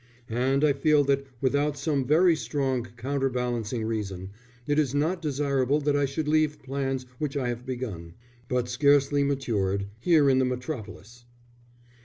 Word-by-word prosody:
And 130 +4 +1
I 150 -2 +4
feel 145 +1 +3
that 140 0 0
without 145 +2 +1
some 140 -2 -1
very 165 +4 +5
strong 135 -5 -2
counter 135 +2 -1
balancing 120 -2 -2
reason, 100 -4 -4 0.3
it 145 +2 +1
is 140 -3 0
not 165 +5 0
desirable 140 -2 +1
that 145 0 +1
I 145 0 +2
should 145 +3 -3
leave 155 -1 +1
plans 135 -1 -2
which 145 -2 -2
I 125 -3 -1
have 120 +1 -5
begun, 105 -10 -5 0.3
but 125 -1 0
scarcely 140 +2 +3
matured, 105 -9 -1 0.2
in 145 -6 +4
the 130 - +3
Metropolis. 120 -2 -6
135 Hz, 150 wpm, -27 LUFS, 125-145 Hz, 0.3 s, very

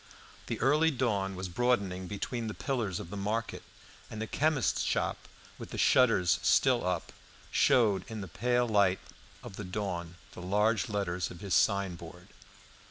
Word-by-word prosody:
The - - -3
early 150 +6 +4
dawn 105 -9 -1
was 95 +1 -4
broadening 95 -3 0
between 115 +4 -4
the 110 - -5
pillars 115 -10 -2
of 85 - -8
the - - -5
market, 105 +3 -3 0.5
and 110 - -7
the 110 - -2
chemist's 145 -1 +1
shop, - - -1 0.3
with - - -8
the - - -7
shutters 115 -9 +4
still 130 -3 +3
up, 90 -2 -2 0.4
showed 105 -7 +3
in 110 -2 -5
the 95 - -6
pale 120 +7 0
light 100 -4 +3 0.5
of 95 - -9
the 105 - -5
dawn 90 -3 -4 0.2
the - - -10
large 105 +6 +1
letters 95 -4 -2
of 85 - -11
his 100 -3 -3
signboard. 90 -4 0
100 Hz, 160 wpm, -30 LUFS, 90-120 Hz, 0.5 s, early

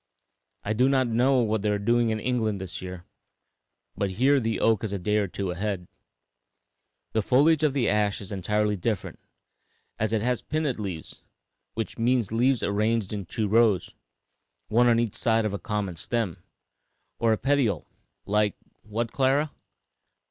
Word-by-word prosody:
I 105 - -1
do 125 +4 +3
not 135 -1 +3
know 125 +3 +3
what 110 -2 0
they 105 - 0
are 105 - +1
doing 115 +3 +2
in 110 -1 -1
England 110 -4 -1
this 95 -2 -6
year, 90 -1 -8 0.9
but 100 - -1
here 130 +9 +3
the 115 -4 -1
oak 115 -2 +2
is 110 - -2
a 100 - -1
day 105 +3 0
or 105 -2 +1
two 95 0 -3
ahead. 95 0 -3 1.3
The 110 - +2
foliage 145 +8 +4
of 150 -3 +2
the 135 -5 +1
ash 105 -1 +1
is 100 -1 -8
entirely 105 +2 0
different, 100 +1 -3 0.8
as 110 0 0
it 110 -1 0
has 125 0 0
pinnate 155 -6 -2
leaves, 95 -6 -6 0.5
which 115 +1 -4
means 120 -3 +1
leaves 125 +2 +2
arranged 105 0 0
in 100 -4 -5
two 110 +3 -2
rows, 110 -3 +3 0.8
one 120 +3 +4
on 115 -1 +4
each 115 -4 0
side 115 -1 +1
of 105 - -1
a 100 - -3
common 105 -5 -3
stem, 110 -2 -2 0.8
or 115 -1 +3
petiole, 135 -5 +1 0.4
like 105 0 +1 0.3
What, 115 +2 -3
Clara?" 140 +3 +2
110 Hz, 165 wpm, -26 LUFS, 100-120 Hz, 1.3 s, foliage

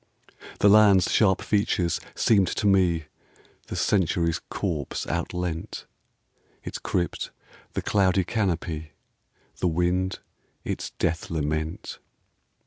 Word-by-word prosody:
The - - +6
land's 100 -2 +6
sharp 95 -4 +3
features 100 -5 +1 0.2
seemed 100 -5 +4
to 105 - -2
me 90 -5 +3 0.6
The - - -5
Century's 85 -3 +1
corpse 80 -9 -3
outleant, 90 -2 -3 0.8
Its - - -5
crypt 85 -1 -2 0.4
the - - -2
cloudy 95 -2 +3
canopy, 85 -7 -2 0.6
The 90 - 0
wind 90 +3 0 0.5
its - - -3
death 85 -1 -1
lament. 80 0 -3
90 Hz, 100 wpm, -26 LUFS, 80-100 Hz, 0.8 s, The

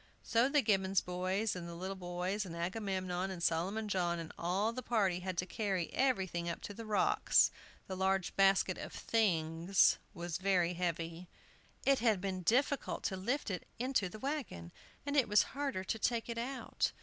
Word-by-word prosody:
So 235 +3 +3
the 290 -1 +3
Gibbons 195 -2 +3
boys, 185 +4 -1
and 170 -1 -6
the 170 - -7
little 190 +3 -4
boys 180 +3 -2
and 175 -4 -7
Agamemnon, 185 0 -2
and 180 -3 -5
Solomon 190 +7 0
John, 175 -4 0
and 165 -1 -6
all 195 +6 0
the 255 - -4
party 205 -7 +1
had 185 -1 -4
to 180 - 0
carry 195 -4 -2
everything 190 -10 +1
up 170 - -4
to 205 - -6
the 225 +2 -8
rocks. 410 - +4 0.3
The 190 - -5
large 190 -1 0
basket 195 -1 +3
of - - -7
"things" 175 -4 +2 0.2
was 175 -1 -4
very 185 -2 +2
heavy. 170 0 -3 0.6
It 275 -1 +4
had 220 -4 +3
been 185 -1 -3
difficult 260 - +1
to 190 - -1
lift 235 +6 -1
it 180 - -5
into 250 -6 0
the 215 - -9
wagon, 230 - -4 0.3
and 285 0 -2
it 270 -6 +4
was 210 -1 +6
harder 275 -9 -2
to 220 +4 -2
take 235 +1 0
it 230 0 -3
out. 260 +3 -2
190 Hz, 180 wpm, -34 LUFS, 180-225 Hz, 0.6 s, was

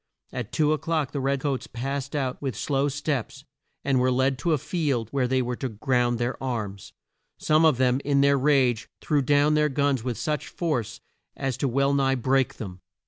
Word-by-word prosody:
At 125 -4 -5
two 155 -1 +2
o'clock 155 -1 -1
the 145 - -3
red 135 0 0
coats 140 -3 -2
passed 135 +4 -4
out 130 -3 -2
with 135 -6 -3
slow 140 0 0
steps, 140 -1 -3 0.4
and 135 -2 +2
were 130 +1 +2
led 130 +1 +1
to 170 - 0
a 155 - +3
field 135 - -1
where 135 -3 +1
they 130 0 +1
were 125 0 -2
to 130 - -3
ground 120 +1 0
their 120 +2 -2
arms. 110 -7 -4 0.5
Some 155 +1 +3
of 155 -6 +4
them, 130 +1 +2
in 140 -1 +2
their 140 0 +4
rage, 130 -5 +2
threw 150 -2 +1
down 145 +2 +3
their 150 0 +3
guns 140 -3 +1
with 125 -2 -3
such 150 -2 -2
force 130 -11 -3 0.4
as 135 -2 -1
to 140 - 0
well 140 +2 +2
nigh 135 -1 +2
break 130 +1 +1
them. 95 -4 -8
135 Hz, 195 wpm, -25 LUFS, 125-145 Hz, 0.5 s, of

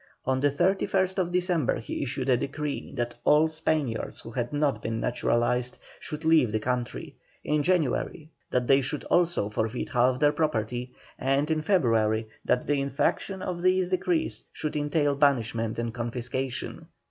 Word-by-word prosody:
On 130 0 +1
the 145 +2 +3
31st 185 +3 +1
December 175 -6 +1
he 115 - -5
issued 130 -1 -3
a 130 - +5
decree, 145 +3 -3
that 120 -1 -2
all 150 +2 +5
Spaniards 155 -6 -2
who 115 - -9
had 120 0 -2
not 145 -1 0
been 115 0 -2
naturalised 125 +1 0 0.2
should 155 +1 -6
leave 160 -8 +5
the 110 - 0
country; 125 +2 -3 0.3
in 150 0 +1
January, 160 -1 0 0.2
that 125 -1 +1
they 135 +2 +5
should 140 +3 -3
also 175 -11 +2
forfeit 110 +3 -2
half 125 0 +2
their 145 0 +5
property; 125 -4 -1 0.3
and 135 +4 +1
in 155 -1 +1
February, 115 - +2 0.2
that 125 - +1
the 145 -1 +1
infraction 140 +7 -1
of 175 -1 -3
these 185 0 +3
decrees 180 -2 0
should 155 - -4
entail 145 0 +1
banishment 120 -6 +1
and 115 -1 -2
confiscation. 120 +2 -4
140 Hz, 155 wpm, -27 LUFS, 120-160 Hz, 0.3 s, a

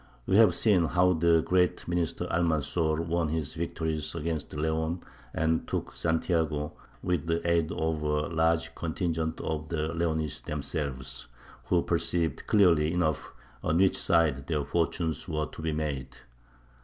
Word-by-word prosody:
We 95 - +1
have 115 -1 +6
seen 95 -7 +4
how 90 +2 +3
the 85 -1 +3
great 90 0 +1
minister 85 0 -1
Almanzor 80 -1 +1
won 85 -1 0
his 80 -2 -2
victories 80 -1 -3
against 80 -1 -3
Leon 80 +3 -1 0.3
and 80 +2 0
took - - -3
Santiago 80 -3 0 0.3
with 90 -3 -1
the 85 +1 0
aid 85 -2 +2
of 80 -1 -1
a 75 0 0
large 80 0 +1
contingent 80 -1 -2
of 80 -1 -3
the 80 -1 -2
Leonese 80 -3 -1
themselves, 70 -3 -4 0.4
who 90 -2 +2
perceived 85 0 0
clearly 85 -7 +4
enough 80 -6 -1 0.3
on 80 - +1
which 95 +1 +4
side 75 -5 +2
their 75 -3 0
fortunes 85 +2 -1
were 75 -1 -1
to 80 - -10
be 80 0 -1
made. 75 -4 -2
80 Hz, 145 wpm, -29 LUFS, 75-85 Hz, 0.4 s, have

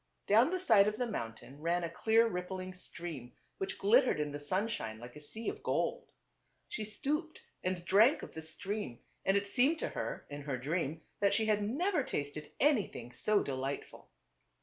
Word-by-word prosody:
Down 225 +7 +5
the 370 +1 -1
side 220 - +6
of 210 0 0
the 245 - 0
mountain 130 - -6
rail 170 +2 +1
a - - 0
clear 225 +7 +3
rip 180 -4 -3
pling 185 0 -5
stream 165 -8 -6 0.3
which 195 - -2
glittered 235 - +4
in 150 -1 -1
the 145 - -5
sunshine 145 - -1
like 120 +2 -10
a - - -8
sea 220 +10 -5
of - - -3
gold. - - -1 0.6
She 215 - -4
stooped 300 +9 -2 0.2
and 185 -1 -2
drank 220 - +5
of - - -8
the 160 - -6
stream 160 - -4 0.3
and 195 +1 +4
it 200 0 -1
seemed 265 +9 +3
to - - -2
her, - - -4
in 145 0 -7
her 140 -2 -2
dream, 155 +3 -2 0.2
that 200 -1 +4
she 220 - +2
had 210 -1 +2
never 300 - +1
tasted 150 - -4
anything 215 - +2
so 200 - +2
delightful. 135 +1 -4
185 Hz, 185 wpm, -33 LUFS, 145-225 Hz, 0.6 s, side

